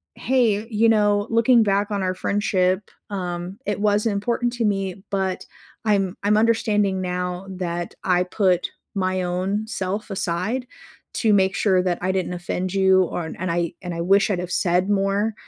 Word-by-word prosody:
"Hey, 230 -5 +1
you 225 0 +3
know, 205 -1 +3
looking 230 +1 +4
back 205 +1 +1
on 200 -1 -1
our 185 0 0
friendship, 185 -1 +1 0.3
um, 180 -1 -4
it 205 -2 -2
was 210 0 +2
important 235 +3 0
to 240 -1 -2
me 195 -2 -2
but 190 -2 -2 0.4
I'm 195 -3 +1
I'm 210 +1 +3
understanding 210 -4 +2
now 180 +1 -3
that 175 -2 -4
I 180 -1 +3
put 180 -1 +1 0.3
my 185 -1 0
own 185 +4 -1
self 200 0 -3
aside 195 +6 -2 0.5
to 220 -3 +2
make 190 -1 +3
sure 190 -3 +3
that 180 -2 0
I 185 +1 0
didn't 185 -1 -1
offend 180 +1 -3
you 190 -1 +4
or 175 -1 -3
and 170 +2 -4
I 170 0 -1
and 180 -2 -5
I 170 - -5
wish 195 +4 +3
I'd 190 -3 0
have 180 0 -4
said 180 +2 +1
more." 200 +2 +1
195 Hz, 170 wpm, -23 LUFS, 180-210 Hz, 0.5 s, looking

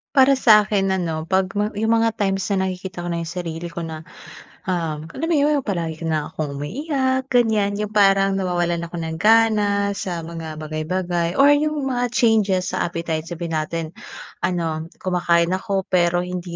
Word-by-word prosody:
Para 270 +1 +6
sa 215 -5 +6
akin 195 -2 0
ano 170 -4 -1
pag 190 0 +1
mga 205 0 -2
yung 225 0 +3
mga 230 - +3
times 195 -1 0
na 190 -1 +1
nakikita 185 -1 -5
ko 175 - -2
na 170 - -2
yung 165 - -5
sarili 170 -1 -5
ko 170 0 -5
na 160 -1 -7 0.6
um 165 -4 -2
alam 325 +4 -3
yun 295 -2 +3
yung 250 - -10
palagi 165 -5 -2
ka 165 - -4
nalang 155 -2 -1
akong 145 -3 -4
umiiyak 260 - -1
ganyan. 220 -5 +2
Yung 210 0 -3
parang 195 -2 +3
nawawalan 175 -2 0
ako 175 - -9
ng 160 -1 -4
gana 210 -2 +3
sa 175 -4 -4
mga 165 -1 -7
bagay-bagay. 170 +3 -2
Or 280 +1 +6
yung 300 0 +1
mga 245 -2 0
changes 210 -6 +2
sa - - 0
appetite, 165 -1 -3
sabihin 170 -2 -3
natin 165 +1 -3 0.5
ano 165 -3 -2 0.2
kumakain 175 -1 +2
ako 195 0 -1
pero 175 0 +2
hindi 180 -1 -5
185 Hz, 180 wpm, -21 LUFS, 170-210 Hz, 0.6 s, Para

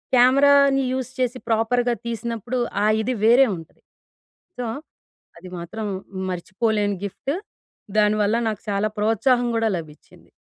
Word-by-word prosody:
కెమెరాని 275 +2 +5
యూస్ 260 -1 -3
చేసి 250 0 0
ప్రాపర్‌గా 240 +2 +1
తీసినప్పుడు 235 +1 -3 0.2
ఆ - - +3 0.2
ఇది 250 +3 -1
వేరే 245 +4 +6
ఉంటది. 165 0 -14 0.8
సో 250 - -3 0.7
అది 180 +2 -11
మాత్రం 210 +6 -5 0.4
మర్చిపోలేని 205 +3 -1
గిఫ్టు. 270 +8 -4 0.7
దానివల్ల 210 0 +2
నాకు 215 -2 -5
చాలా 200 +1 +1
ప్రోత్సాహం 240 +4 +2
కూడా 225 0 +1
లభిచ్చింది. 155 -2 -12
225 Hz, 115 wpm, -22 LUFS, 210-250 Hz, 0.8 s, వేరే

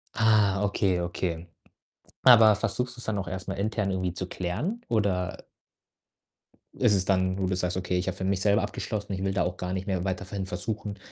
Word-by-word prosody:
Ah, 105 -3 +3
okay, 100 -2 +1
okay. 85 -1 -3 0.8
Aber 110 -4 +8
versuchst 125 +4 -2
du's 120 - -8
dann 110 -2 -1
auch 100 - -3
erst 95 0 -6
mal 95 - -2
intern 105 0 -1
irgendwie 95 -2 -1
zu 90 0 -4
klären 140 - -3
oder 100 -5 0 1.3
ist - - +4
es 95 -2 +2
dann, 95 -1 +1
wo 95 - -2
du 95 - 0
das 95 -1 -1
sagst: 90 0 -1
„Okay, 90 0 -1
ich 90 - -2
habe 95 - -1
für 95 - -4
mich 95 0 +1
selber 105 +1 +3
abgeschlossen, 105 0 -4
ich 95 0 -3
will 95 0 0
da 95 -2 +1
auch 90 +1 -3
gar 90 0 -3
nicht 95 +1 -4
mehr 95 -3 -1
weiter 95 0 -2
ver 95 - -8
hin 95 - -2
versuchen 105 +1 -4
95 Hz, 215 wpm, -27 LUFS, 90-105 Hz, 1.3 s, Aber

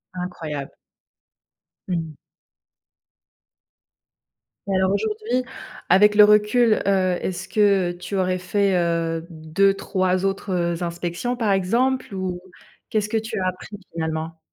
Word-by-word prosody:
Incroyable. 160 -6 -5 1.1
Mmh. 165 -3 -3 2.6
Alors, 190 0 +2
aujourd'hui, 220 +4 -1 0.5
avec 210 +3 +6
le 210 - +9
recul, 210 +2 +4
heu, 185 -2 +2
est-ce 185 0 -4
que 200 -4 +3
tu 180 +2 -6
aurais 185 -1 +1
fait, 195 +2 +1
heu, 165 -1 -1
2-3 185 +3 0
autres, 195 0 -2
heu, 170 -1 -1
inspections 175 +7 -3
par 225 -4 0
exemple 235 +6 +1
ou? 185 -1 -3 0.5
Qu'est-ce 210 -1 0
que 225 - 0
tu 220 +1 -4
as 185 - 0
appris 185 +3 -6 0.2
finalement? 160 0 -4
185 Hz, 110 wpm, -22 LUFS, 175-210 Hz, 2.6 s, le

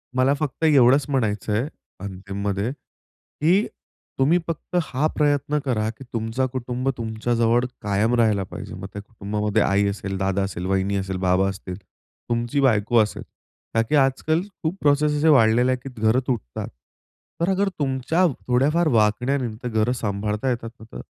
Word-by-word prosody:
मला 130 +2 +3
फक्त 150 0 -3
एवढंच 140 -2 +5
म्हणायचंय, 110 -2 0 0.3
अंतिममध्ये 100 +2 -3
की 170 - -2 0.5
तुम्ही 145 +6 +4
फक्त 165 +2 -5
हा 135 0 -1
प्रयत्न 145 0 +1
करा 110 -5 0
की 115 +4 -9
तुमचं 115 +3 -1
कुटुंब 125 +1 -2
तुमच्या 115 +1 -2
जवळ 115 +1 +3 0.2
कायम 105 +3 +1
राहिला 110 -4 +2
पाहिजे. 95 - -8
मग 95 +1 -7
त्या 105 - -6
कुटुंबामध्ये 105 0 -2
आई 100 +1 +2
असेल, 100 -1 -4
दादा 95 0 0
असेल, 90 -2 -4
वहिनी 95 +1 0
असेल, 95 -1 -3
बाबा 90 +1 +2
असतील, 95 -1 -6 0.5
तुमची 120 +4 0
बायको 115 -3 +3
असेल 105 - -6 0.5
ताकि 115 +5 +2
आजकाल 145 +4 +2 0.2
खूप 160 +3 -1
प्रोसेस 150 +1 +3
असे 150 +2 +2
वाढलेले 125 -2 +5
आहे 130 - +1
की 135 - -6
घरं 110 +3 +4
तुटतात. 110 - -3 0.7
तर 170 - +2
अगर 195 +1 +2
तुमच्या 140 +6 +1 0.2
थोड्याफार 145 +7 +2
वागण्याने 120 +4 +2 0.2
ते 125 - -2
घरं 110 +1 +1
सांभाळता 105 +3 -1
येतात 115 -2 -2
ना 110 - -12
तर - - -6
115 Hz, 155 wpm, -23 LUFS, 105-135 Hz, 0.7 s, एवढंच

